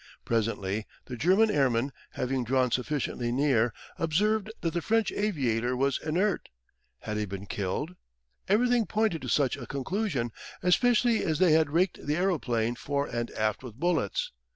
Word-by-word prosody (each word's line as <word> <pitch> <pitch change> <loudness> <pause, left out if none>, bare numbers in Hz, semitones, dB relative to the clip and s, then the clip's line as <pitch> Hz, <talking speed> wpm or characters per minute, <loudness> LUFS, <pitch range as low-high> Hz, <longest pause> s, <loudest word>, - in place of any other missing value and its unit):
Presently 110 -2 -1 0.2
the 125 - -6
German 190 - +4
airmen, 135 - +2 0.2
having 130 0 -1
drawn 125 +1 +1
sufficiently 125 -2 -1
near, 125 -3 +2 0.3
observed 205 +6 +1
that 165 - -1
the 175 - -1
French 225 +3 +1
aviator 125 - 0
was 135 0 +1
inert. 180 +6 0 0.5
Had 105 - -4
he 105 - 0
been 100 0 -7
killed? 100 - -3 0.5
Everything 235 +3 +3
pointed 215 -7 0
to 125 - -5
such 135 -2 +2
a 120 -4 -8
conclusion, 140 - -2 0.3
especially 235 +4 +3
as 155 -2 0
they 180 -1 +4
had 155 -1 +4
raked 170 +4 +1
the 145 +1 0
aeroplane 125 -11 0
fore 140 +3 -2
and 120 -4 -3
aft 110 -1 0
with 125 -5 -9
bullets. 160 - 0
140 Hz, 150 wpm, -28 LUFS, 120-185 Hz, 0.5 s, German